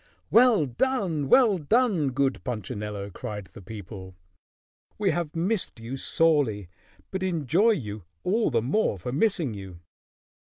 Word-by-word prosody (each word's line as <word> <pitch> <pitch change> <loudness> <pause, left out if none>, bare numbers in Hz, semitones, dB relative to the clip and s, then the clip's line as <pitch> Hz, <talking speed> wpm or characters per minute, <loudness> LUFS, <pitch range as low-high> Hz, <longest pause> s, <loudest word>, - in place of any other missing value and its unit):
"Well 230 -9 +6
done! 165 - -1
Well 220 - +5
done! 195 - +2
Good 135 +1 0
Punchinello!" 105 -3 -5
cried 105 -1 -6
the - - -11
people. 95 -2 -9 0.8
"We 200 -3 +2
have 165 -1 -3
missed 180 - -1
you 115 +4 -6
sorely, 135 - +1 0.4
but 190 - -3
enjoy 185 - +2
you 105 - -6 0.2
all 220 +5 +1
the 115 -5 +1
more 135 - +1
for 95 +7 -5
missing 160 - +1
you." 95 -4 -9
140 Hz, 130 wpm, -26 LUFS, -, 0.8 s, Well